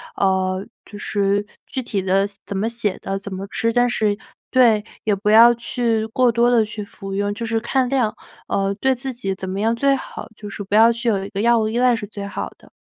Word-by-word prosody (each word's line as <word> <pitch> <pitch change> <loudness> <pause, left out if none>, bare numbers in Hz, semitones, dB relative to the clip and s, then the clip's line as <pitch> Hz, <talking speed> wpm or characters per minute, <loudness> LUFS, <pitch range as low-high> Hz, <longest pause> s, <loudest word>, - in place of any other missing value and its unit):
呃， 190 0 +1 0.2
就 205 - -11
是 205 -1 0 0.2
具 260 - -4
体 205 -5 -2
的 190 +1 +2
四 200 -1 -14
怎 200 - -4
么 215 +4 0
写 230 -4 -2
的、 195 0 -3
怎 200 -1 -7
么 190 +1 -5
吃。 230 0 0
但 245 0 +3
是 210 -3 0 0.3
对， 235 -5 +4 0.2
也 210 -2 +2
不 205 +2 -1
要 230 +3 +8
去 235 -1 -1
过 250 +3 +2
多 235 +1 +3
地 230 -3 +4
去 210 0 -6
服 195 -1 -8
用， 205 +1 -1
就 230 +3 -5
是 225 0 0
看 255 +1 +1
量， 245 -5 +1 0.4
呃， 195 0 0
对 265 0 +3
自 260 +1 -5
己 195 -5 -3
怎 190 0 -6
么 195 +2 -3
样 225 +1 +2
最 275 +3 +2
好， 270 - -7
就 210 -1 -9
是 205 - -7
不 200 +1 -2
要 225 +2 +7
去 235 +1 -4
有 200 -4 +1
一 195 - -6
个 200 -1 -5
药 235 +2 +4
物 215 -1 +1
依 225 - -2
赖 250 -1 +4
是 225 -2 -5
最 200 -1 -7
好 200 - -5
的。 - - -20
215 Hz, 260 characters per minute, -21 LUFS, 200-235 Hz, 0.4 s, 要